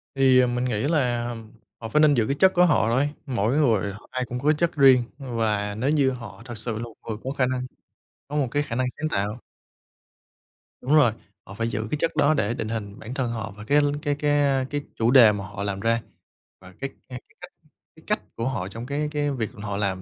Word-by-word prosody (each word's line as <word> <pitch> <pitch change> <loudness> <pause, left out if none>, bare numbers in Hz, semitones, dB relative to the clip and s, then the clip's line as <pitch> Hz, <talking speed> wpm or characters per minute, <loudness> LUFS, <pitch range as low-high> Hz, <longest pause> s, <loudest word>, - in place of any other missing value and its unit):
Thì, 130 -1 +5
à, 125 - +3
mình 125 +1 -1
nghĩ 110 -4 -1
làm 120 -6 -1 0.3
họ 115 -1 -6
phải 150 - +2
nên 150 -1 +6
giữ 115 -4 +2
cái 140 - 0
chất 190 0 +5
của 180 0 +5
họ 150 -9 +3
thôi, 135 +5 +2 0.2
mỗi 120 -1 0
người 110 -9 +2
họ, 105 - -14
ai 130 0 -2
cũng 125 0 -5
có 150 +3 +3
chất 165 +2 0
riêng, 135 -4 +6
và 110 -6 -1
nếu 125 +6 0
như 140 -3 +3
họ 115 -5 -9
thật 120 -2 -7
sự 110 0 -4
là 115 - -4
một 115 -2 -9
người 110 -2 -3
có 130 - -3
khả 130 - +3
năng, 125 0 -2 0.6
có 145 - -4
một 140 -4 +1
cái 145 +3 +1
khả 120 - -5
năng 130 - +1
sáng 155 - 0
tạo. 105 -3 -2 1.4
Đúng 145 +4 +2
rồi, 135 -7 +6 0.3
họ 100 - -10
phải 115 +2 -2
giữ 110 -1 -3
cái 150 - 0
chất 165 - 0
đó 150 +2 +4
để 115 -7 0
định 110 -2 -4
hình 105 -2 -5
bản 115 +3 -7
thân 130 -3 -1
họ 110 -2 -4
và 105 - -9
cái 145 +6 +3
l 145 - +1
cái 145 -3 0
cái, 145 0 0
a, 140 -2 +2
cái 145 +1 -2
chủ 115 +1 +2
đề 120 -5 +8
mà 100 -2 -5
họ 100 0 -6
làm 100 -1 -2
ra, 115 +2 +1 0.6
và 95 -1 -14
cái 135 - -3 0.2
cái 125 -1 -7
cái - - -28
cách - - -10 0.4
cái - - -18
cách - - 0
của 115 - -2
họ 95 -9 -3
trong 115 +5 -7
cái 145 +3 -2
cái 145 -1 0
việc 115 -5 -2
họ 100 -1 -5
làm 95 -2 -1
125 Hz, 250 wpm, -24 LUFS, 110-140 Hz, 1.4 s, đề